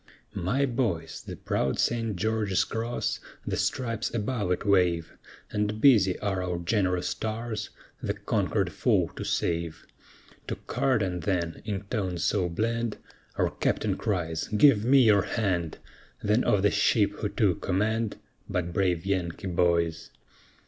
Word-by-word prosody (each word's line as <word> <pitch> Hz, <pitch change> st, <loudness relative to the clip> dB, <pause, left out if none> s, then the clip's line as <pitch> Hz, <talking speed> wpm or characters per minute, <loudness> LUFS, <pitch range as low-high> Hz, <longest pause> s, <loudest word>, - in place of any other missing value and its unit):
My 120 Hz, +11 st, +1 dB
boys, 115 Hz, -11 st, -2 dB
the -, -, -7 dB
proud 65 Hz, -, -1 dB
St. 115 Hz, -3 st, 0 dB
George's 105 Hz, 0 st, +1 dB
Cross, 115 Hz, +2 st, -2 dB, 0.3 s
the -, -, -1 dB
stripes 115 Hz, -6 st, -1 dB
above 110 Hz, -2 st, -1 dB
it 90 Hz, -, -1 dB
wave, 90 Hz, -5 st, +2 dB, 0.4 s
And 105 Hz, +1 st, -1 dB
busy 105 Hz, -8 st, +5 dB
are 95 Hz, -3 st, -1 dB
our 90 Hz, -1 st, -2 dB
gen'rous 90 Hz, 0 st, 0 dB
tars, 110 Hz, 0 st, -4 dB, 0.3 s
the -, -, -2 dB
conquered -, -, 0 dB
foe -, -, +1 dB
to -, -, -5 dB
save, 85 Hz, -1 st, -2 dB, 0.6 s
To -, -, -2 dB
Carden 100 Hz, -9 st, 0 dB
then, 85 Hz, -3 st, -2 dB
in 100 Hz, -2 st, -3 dB
tones 95 Hz, -5 st, -2 dB
so 95 Hz, -4 st, +1 dB
bland, 115 Hz, +5 st, -1 dB, 0.4 s
Our -, -, +1 dB
Captain -, -, 0 dB
cries 85 Hz, -6 st, -2 dB
"Give 110 Hz, 0 st, +5 dB
me 130 Hz, +2 st, +6 dB
your 105 Hz, -3 st, +5 dB
hand," 90 Hz, -7 st, -1 dB, 0.5 s
Then 105 Hz, +4 st, +3 dB
of 100 Hz, -2 st, +3 dB
the 100 Hz, -, +4 dB
ship -, -, +3 dB
who -, -, -1 dB
took -, -, +1 dB
command 110 Hz, +3 st, 0 dB, 0.3 s
But 85 Hz, -1 st, -2 dB
brave 90 Hz, -2 st, +1 dB
Yankee 95 Hz, -2 st, -2 dB
boys? 85 Hz, -2 st, +1 dB
100 Hz, 140 wpm, -27 LUFS, 90-110 Hz, 0.6 s, me